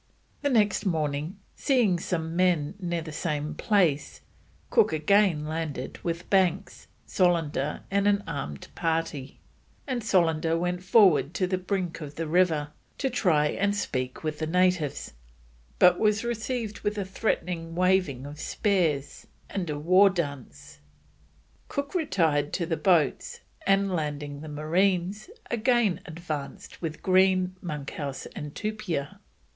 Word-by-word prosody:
The 285 - +1
next 210 -6 +2
morning, 155 -1 -1 0.2
seeing 235 - +2
some 165 -2 -3
men 175 -4 +2
near 175 -3 -2
the 155 - -7
same 150 -1 -2
place, 160 -5 +1 0.5
Cook - - +4
again 160 0 +3
landed 155 -4 -4
with 170 0 -3
Banks, 190 0 +1 0.2
Solander, 165 -6 +1
and 200 +1 +2
an 200 0 +2
armed 70 +1 -5
party; 165 -5 -2 0.4
and 255 -4 -3
Solander 165 -5 +2
went 180 +1 -1
forward 185 -5 +4
to 185 - +1
the 185 0 -1
brink 185 -3 -3
of 150 -1 -7
the 165 - -3
river 160 -3 +2 0.3
to 270 -2 -1
try 160 -10 +2
and 200 +4 0
speak 130 -10 -3
with 155 -1 -3
the 155 - -2
natives, 180 - +1 0.6
but 180 - +6
was 215 0 +2
received 235 -2 -3
with 205 +1 -2
a 200 - -2
threatening 175 -4 -2
waving 180 -8 +2
of 145 +1 -9
spears 170 -9 -1 0.2
and 180 -4 -3
a 150 - -2
war 185 +6 +5
dance. 140 - -5 0.9
Cook 280 0 -4
retired 165 - +1
to 175 - 0
the 165 - -1
boats, 165 -6 +1 0.3
and 195 0 +3
landing 145 -3 -3
the 155 - -8
marines, 180 - 0 0.2
again 235 -4 +2
advanced 155 -4 -6
with 160 -2 -5
Green, 185 0 +3
Monkhouse, 145 -3 -5
and 145 -1 -7
Tupia. 210 -10 -3
175 Hz, 135 wpm, -27 LUFS, 150-195 Hz, 0.9 s, but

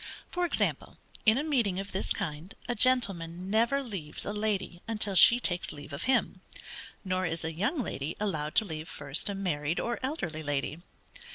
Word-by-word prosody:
For 355 0 0
example, - - 0 0.3
in 220 +2 +7
a 285 - 0
meeting 235 -12 +1
of 195 0 -5
this 190 - -2
kind, 155 +4 -3
a 245 - 0
gentleman 195 -8 +2
never 235 +6 +3
leaves 190 - -6
a 205 - -2
lady 210 -4 -2
until 210 -3 +2
she 235 +6 +8
takes 175 -7 0
leave 145 0 -9
of 140 - -4
him; 260 0 +1 0.6
nor 185 0 0
is 165 0 -3
a 165 - -2
young 210 - 0
lady 150 -4 -4
allowed 155 -7 -2
to 220 - +5
leave 160 -3 -6
first 145 +6 -3
a 200 - -2
married 165 -5 -1
or 240 0 -2
elderly 185 - -3
lady. 145 +2 -2
190 Hz, 180 wpm, -30 LUFS, 160-225 Hz, 0.6 s, she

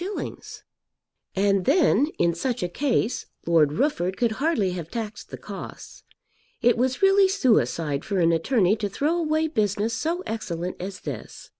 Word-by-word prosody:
_ - - -7 0.7
And 195 -1 +2
then, 290 - +4
in 170 0 +2
such 245 +7 -2
a - - 0
case, 250 +1 -1 0.2
Lord 160 -4 +3
Rufford 190 - 0
could 235 -2 +1
hardly 290 - +1
have 170 -3 -6
taxed 220 0 -6
the - - -7
costs. - - -9 0.6
It 240 - +4
was 255 +6 -1
really 390 0 +6
suicide 215 - +1
for 200 - -2
an 170 -1 +4
attorney 185 +4 +2
to 205 -1 -2
throw 295 - 0
away 315 -1 +1
business 215 - 0
so 330 +9 -2
excellent 180 - -4
as 190 +1 -6
this. - - -8
220 Hz, 155 wpm, -25 LUFS, 180-290 Hz, 0.7 s, really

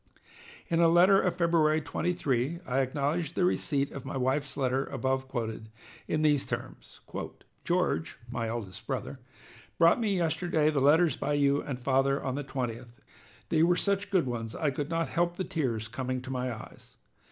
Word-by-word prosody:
In 165 -1 +1
a 170 - +6
letter 180 +4 +6
of 180 - 0
February 165 -3 +3
23, 150 -1 -1
I 130 +1 0
acknowledged 145 +5 -1
the 180 - +2
receipt 140 -5 0
of 135 - -7
my 135 0 -4
wife's 135 +2 -1
letter 130 0 +1
above 130 0 -2
quoted, 110 -4 -4 0.4
in 155 - 0
these 145 -2 +3
terms: - - -7 0.6
"George 80 +1 0
[my 115 -1 -3
eldest 110 -5 -6
brother] - - -4 0.6
brought 165 +7 +5
me 205 -4 +1
yesterday 160 -2 +1
the 145 -3 0
letters 155 +2 +5
by 145 - -2
you 140 0 +3
and 135 -4 -5
father 135 +2 +2
on 130 - -3
the 145 +2 -3
20th, 125 -4 -3
and 120 - -15 0.6
they 160 - +3
were 175 +2 +4
such 200 0 0
good 185 -7 +2
ones 115 -2 -4
I 150 -3 0
could 145 +2 -4
not 165 0 -1
help 175 0 0
the 185 - -2
tears 120 - -2
coming 130 +3 -3
to 130 - -6
my 125 -1 -2
eyes. 110 -2 -11
140 Hz, 175 wpm, -29 LUFS, 130-165 Hz, 0.6 s, a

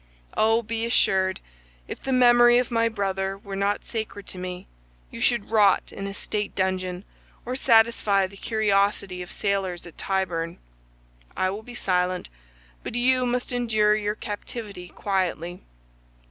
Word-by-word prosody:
Oh, 225 +2 +3
be 225 +1 -3
assured, 190 -5 +2 0.5
if - - -7
the 265 - -3
memory 240 -1 +6
of 250 0 0
my 230 0 +2
brother 195 -2 -2
were 200 0 -7
not 200 +1 0
sacred 215 -3 -5
to 185 - -8
me, 180 0 -6 0.5
you - - -8
should 235 -3 +1
rot 210 -3 +4
in 195 - -5
a 195 - -5
state 210 0 -3
dungeon 185 0 -1 0.4
or 250 +2 -3
satisfy 225 -6 +4
the 195 +1 -10
curiosity 200 -3 +1
of 180 - -8
sailors 195 -4 -2
at 175 - -13
Tyburn. 175 -4 -1 0.8
I 185 0 +1
will 205 +3 -5
be 245 +2 -11
silent, 180 -4 0 0.5
but - - -6
you 250 +1 +3
must 245 +2 -1
endure 220 -4 +2
your 210 0 -1
captivity 205 -3 -7
quietly. 180 -2 -2
200 Hz, 145 wpm, -25 LUFS, 190-230 Hz, 0.8 s, memory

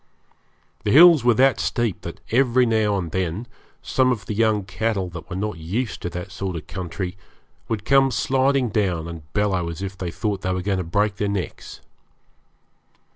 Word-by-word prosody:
The - - -1
hills 160 +2 +8
were 120 -1 +4
that 135 +3 +4
steep 120 -6 -1
that - - -8
every 125 +1 +4
now 110 -3 +2
and 85 -4 -4
then 95 +4 -2 0.4
some 130 -1 +2
of 105 -6 -3
the - - -3
young 110 -1 +2
cattle 100 -1 -2
that 85 -1 -9
were 90 - -5
not 100 -3 -3
used 105 +9 -3
to 90 - -3
that 90 +1 -7
sort 95 -2 -4
of 80 - -6
country 90 0 -5 0.5
would 110 -2 -3
come 135 -1 +5
sliding 135 0 +1
down 95 -6 0
and 80 -3 -9
bellow 95 -5 0
as 85 +3 -6
if 95 0 -5
they 90 -2 -4
thought 95 +4 -3
they 95 - -1
were 90 - -3
going 100 -1 0
to - - -1
break 100 +4 0
their 105 -1 -1
necks. 100 -2 -5
100 Hz, 185 wpm, -23 LUFS, 90-115 Hz, 0.5 s, hills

